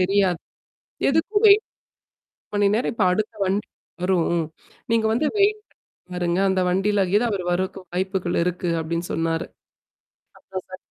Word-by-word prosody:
தெரியாது. 185 Hz, -2 st, +2 dB, 0.7 s
"எதுக்கும் 405 Hz, +9 st, +1 dB
வெயிட் 410 Hz, +2 st, +7 dB, 0.9 s
மணி 205 Hz, -1 st, +3 dB
நேரம். 230 Hz, +2 st, +1 dB
இப்ப 215 Hz, -, +1 dB
அடுத்த 215 Hz, +4 st, -1 dB
வண்டி 200 Hz, +3 st, -1 dB, 0.4 s
வரும். 175 Hz, -2 st, +2 dB, 0.5 s
நீங்க 225 Hz, -1 st, +3 dB
வந்து 270 Hz, +7 st, +1 dB
வெயிட் 420 Hz, +1 st, +3 dB, 0.3 s
பண்ணி -, -, -86 dB, 0.2 s
பாருங்க. 175 Hz, 0 st, 0 dB
அந்த 190 Hz, 0 st, +1 dB
வண்டியிலயேதா 200 Hz, +2 st, +2 dB
அவர் 185 Hz, -3 st, -2 dB
வர்றதுக்கு 185 Hz, +2 st, -2 dB
வாய்ப்புகள் 185 Hz, -1 st, -1 dB
இருக்கு." 180 Hz, 0 st, -2 dB
அப்பிடின்னு 170 Hz, +2 st, -3 dB
சொன்னாரு. 165 Hz, 0 st, -1 dB, 0.9 s
அப்பறம் 190 Hz, -1 st, -7 dB
சரி. 185 Hz, -, -8 dB
190 Hz, 130 wpm, -23 LUFS, 180-215 Hz, 0.9 s, வெயிட்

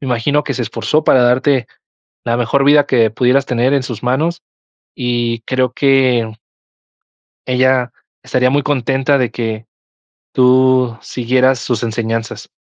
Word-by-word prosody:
me 135 Hz, -, -7 dB
imagino 130 Hz, +5 st, 0 dB
que -, -, -3 dB
se 125 Hz, -, -3 dB
esforzó 155 Hz, +7 st, -1 dB
para 125 Hz, -, +4 dB
darte 125 Hz, 0 st, +2 dB, 0.6 s
la 120 Hz, 0 st, 0 dB
mejor 125 Hz, +3 st, 0 dB
vida 145 Hz, 0 st, +4 dB
que 115 Hz, -4 st, +2 dB
pudieras 125 Hz, +4 st, +1 dB
tener 125 Hz, +2 st, 0 dB
en 135 Hz, -, +1 dB
sus 120 Hz, -4 st, -7 dB
manos 155 Hz, +7 st, -1 dB, 0.5 s
y 120 Hz, -1 st, -2 dB
creo 130 Hz, +1 st, -1 dB
que 130 Hz, -5 st, +2 dB, 1.2 s
ella 130 Hz, -1 st, +1 dB, 0.3 s
estaría 125 Hz, 0 st, +1 dB
muy 145 Hz, +1 st, +1 dB
contenta 135 Hz, 0 st, 0 dB
de 125 Hz, -3 st, -1 dB
que 110 Hz, -2 st, -4 dB, 0.7 s
tú 130 Hz, -2 st, +3 dB
siguieras 125 Hz, +3 st, 0 dB
sus 120 Hz, -2 st, -3 dB
enseñanzas. 115 Hz, 0 st, -4 dB
125 Hz, 140 wpm, -15 LUFS, 120-135 Hz, 1.2 s, para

